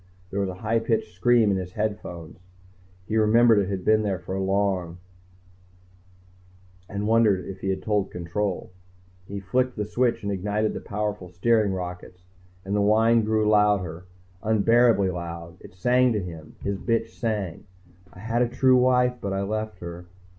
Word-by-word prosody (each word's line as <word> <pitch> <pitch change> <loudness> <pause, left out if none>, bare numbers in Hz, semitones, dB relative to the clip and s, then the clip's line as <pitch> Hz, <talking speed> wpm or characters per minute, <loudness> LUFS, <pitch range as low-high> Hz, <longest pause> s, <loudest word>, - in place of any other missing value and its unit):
_ - - -30
There 100 - -2
was 100 -1 0
a 90 - -6
high 115 +2 +2
pitched 115 -4 -1
scream 110 +3 +3
in 95 - +1
his 90 +1 -6
earphones. 90 -6 -4 0.7
He 110 - 0
remembered 110 +1 +5
it 100 -1 -1
had 95 -2 -4
been 110 0 +4
there 100 -3 -1
for 90 +2 -6
long, 95 -3 0 1.9
and 100 +1 -3
wondered 110 -5 +3
if 95 0 -8
he 95 - -3
had 95 - -2
told 105 -2 0
Control. 90 +3 -3 0.6
He 100 0 -5
flicked 125 +6 0
the 105 - -2
switch 120 +2 0
that 100 - -2
ignited 105 +3 -1
the - - -6
powerful 105 -3 -4
steering 105 +3 +2
rockets, 90 0 -6 0.4
and 100 +2 -2
the 105 - +2
whine 110 +2 +4
grew 110 0 +1
louder, 100 -5 +2 0.4
unbearably 110 -2 +3
loud. 85 -1 -7
It - - -14
sang 125 +5 +3
to 105 - 0
him, 85 -4 -8
his 100 -1 -2
bitch 115 -1 0
sang, 105 -7 -3 0.5
_I 90 - -13
had 115 +2 -1
a 120 - +2
true 130 +1 +4
wife, 125 0 +3
but 100 -1 -3
I 95 0 -1
left 110 -1 -4
her 85 0 -8
105 Hz, 170 wpm, -25 LUFS, 95-110 Hz, 1.9 s, remembered